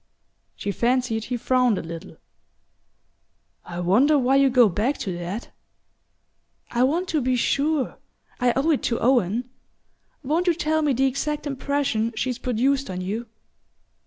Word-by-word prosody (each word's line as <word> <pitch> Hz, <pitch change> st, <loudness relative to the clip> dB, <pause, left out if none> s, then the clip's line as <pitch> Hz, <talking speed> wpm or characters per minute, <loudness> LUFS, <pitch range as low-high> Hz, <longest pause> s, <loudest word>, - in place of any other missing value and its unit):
She 200 Hz, -, -3 dB
fancied 235 Hz, 0 st, 0 dB
he 245 Hz, 0 st, -3 dB
frowned 250 Hz, -2 st, +2 dB
a -, -, -4 dB
little. 165 Hz, +3 st, -9 dB, 1.5 s
"I 175 Hz, 0 st, -7 dB
wonder 250 Hz, -, +4 dB
why 265 Hz, 0 st, +3 dB
you 275 Hz, -1 st, +5 dB
go 245 Hz, -2 st, +5 dB
back 215 Hz, +9 st, 0 dB
to 185 Hz, -4 st, -4 dB
that?" 185 Hz, +7 st, -5 dB, 1.2 s
"I 240 Hz, -, 0 dB
want 325 Hz, +8 st, +1 dB
to 310 Hz, -3 st, +1 dB
be 255 Hz, 0 st, +1 dB
sure 280 Hz, +3 st, 0 dB, 0.4 s
I 245 Hz, -1 st, +3 dB
owe 285 Hz, +5 st, +2 dB
it 295 Hz, -, +1 dB
to 230 Hz, -, -1 dB
Owen. 240 Hz, -1 st, +2 dB, 0.8 s
Won't 320 Hz, +6 st, 0 dB
you 345 Hz, -, +4 dB
tell 315 Hz, -1 st, 0 dB
me 295 Hz, -3 st, +2 dB
the 265 Hz, +2 st, +2 dB
exact 295 Hz, +3 st, -2 dB
impression 275 Hz, -5 st, -1 dB
she's 250 Hz, +2 st, -2 dB
produced 265 Hz, +3 st, 0 dB
on 185 Hz, -1 st, -4 dB
you?" 215 Hz, +6 st, -4 dB
255 Hz, 150 wpm, -24 LUFS, 225-280 Hz, 1.5 s, you